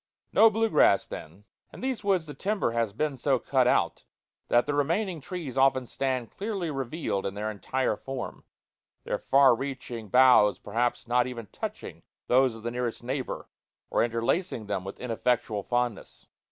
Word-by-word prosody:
No 225 - +7
blue 225 +1 0
grass 100 - +5
then. 90 +7 -9 0.3
In - - -11
these 255 -3 -2
woods 190 -5 +2
the 150 - -8
timber 200 - -1
has 115 -2 0
been 140 +6 -2
so 135 +1 +2
cut 130 0 +1
out - - +1 0.4
that 120 0 +3
the 145 - -1
remaining 165 +4 0
trees 140 -5 -4
often 130 -1 +3
stand 130 -1 -2
clearly 195 -5 -3
revealed 135 - -2
in 100 - -4
their 105 +1 -2
entire 130 +5 -1
form, 135 -1 -6 0.6
their - - -2
far 135 -1 +5
reaching 125 -4 -5
boughs 125 -3 +6
perhaps 120 +3 -2
not 125 +1 +2
even 120 -3 -6
touching - - -6 0.2
those 130 -1 +3
of 110 - -11
their 120 - -2
nearest 120 -1 -3
neighbor, 130 +1 -4 0.4
or - - +3
interlacing 115 - -1
them 100 -2 -2
with 95 - -8
ineffectual 115 -3 -1
fondness. 120 -1 -3
125 Hz, 165 wpm, -27 LUFS, 115-145 Hz, 0.6 s, No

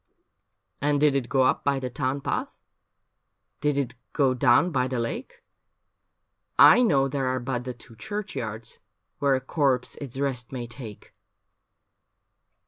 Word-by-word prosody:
' - - -50
And 145 0 +2
did 150 -1 +4
it 125 -3 -1
go 135 -1 +3
up 130 - +2
by 140 -1 +1
the 130 -1 -4
town 135 +2 -2
path, - - -1 1.1
Did 150 -1 0
it 135 -4 -1 0.2
go 135 -4 +3
down 130 +7 +4
by 130 -3 +1
the 130 -1 -3
lake? 255 - -5 1.1
I - - +8
know 140 - +3
there 135 -1 -2
are 130 0 0
but 125 0 -3
the 125 - -4
two 115 -1 -14
cluirchyards 115 - -5 0.4
Where 140 -1 +3
a 130 - -2
corpse 130 -3 0
its 135 -3 -7
rest 130 -4 -2
may 125 -2 -4
take.' 115 -3 -10
130 Hz, 150 wpm, -26 LUFS, 125-140 Hz, 1.1 s, I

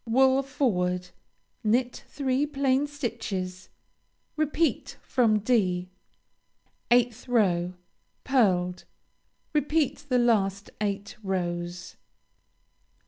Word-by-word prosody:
Wool 265 +3 +4
forward. 180 -10 -1 0.5
Knit 240 +3 0
three 275 0 0
plain 275 -1 +1
stitches. 220 -10 -4 0.7
Repeat 310 +1 0
from 230 -4 +3
(d.) 185 -5 +1 1.0
8th 240 0 +2
row 185 -7 +2 0.5
Pearled. 185 -9 +2 0.7
Repeat 295 -1 0
the 250 - +3
last 205 -5 +1
eight 205 -1 -3
rows. 175 -2 -3
225 Hz, 80 wpm, -27 LUFS, 185-265 Hz, 1.0 s, Wool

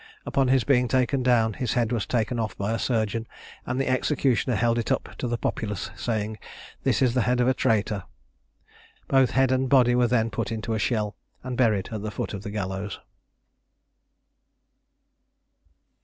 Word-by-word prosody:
Upon 135 -1 +1
his 130 -1 +3
being 125 -3 +3
taken 130 +2 +1
down, 120 -3 +3
his 125 +1 -2
head 120 -2 +1
was 115 -4 -1
taken 120 0 0
off 110 -3 -3
by 100 +2 -2
a 115 - -1
surgeon, 115 -1 -1 0.4
and 125 +1 -1
the 135 - 0
executioner 130 -2 +1
held 115 +2 +2
it 115 - -2
up - - -2
to 125 - -2
the 120 0 -1
populace, 105 -3 -3
saying 110 -2 -3 0.4
"This - - +2
is 125 -2 +3
the 125 - +2
head 125 +2 +1
of 125 - +3
a 130 - +4
traitor." 110 -6 0 1.0
Both 135 -2 +4
head 135 -1 +4
and 130 0 +1
body 125 -3 +5
were 125 0 +3
then 115 -1 +1
put 100 - -3
into 110 0 -3
a 110 - -1
shell, 105 -2 -1 0.3
and 130 -1 -4
buried 110 -6 +2
at 110 -2 -4
the 110 - -3
foot 105 - -4
of 100 - -5
the 105 - -6
gallows. 100 -1 -4
115 Hz, 180 wpm, -25 LUFS, 110-125 Hz, 1.0 s, body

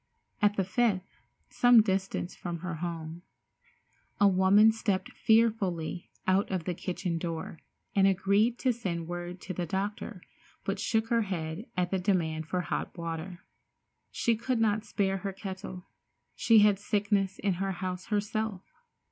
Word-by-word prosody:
At 205 0 +4
the 195 - +1
fifth, 195 -1 0 0.3
some 245 -2 +6
distance 190 -3 -2
from 170 -2 -5
her 175 -2 -4
home, 165 0 -5 1.0
a 205 - +6
woman 195 +3 +6
stepped 220 +1 -1
fearfully 210 -9 +1 0.2
out 190 +2 +2
of 185 -3 -2
the 180 - -2
kitchen 175 -1 -3
door, 165 -1 -5 0.4
and 195 -1 +5
agreed 200 +5 +2
to 255 -1 +1
send 175 -8 -4
word 175 +1 -5
to 185 - -5
the 175 -1 -3
doctor, 200 +1 -3 0.4
but 195 0 -2
shook 220 +1 0
her 235 -1 +3
head 175 0 -4
at 180 -1 0
the 190 - +1
demand 165 -5 0
for 180 +2 -1
hot 180 - -4
water. 170 +2 -5 0.7
She 235 - +1
could 235 +2 -1
not 215 -1 +1
spare 195 -2 0
her 195 0 -4
kettle. 190 -2 -7 0.5
She 225 -2 +5
had 205 -2 +3
sickness 205 -2 0
in 200 - 0
the 195 0 0
house 185 0 -4
herself. 210 -2 -1
195 Hz, 150 wpm, -29 LUFS, 175-210 Hz, 1.0 s, some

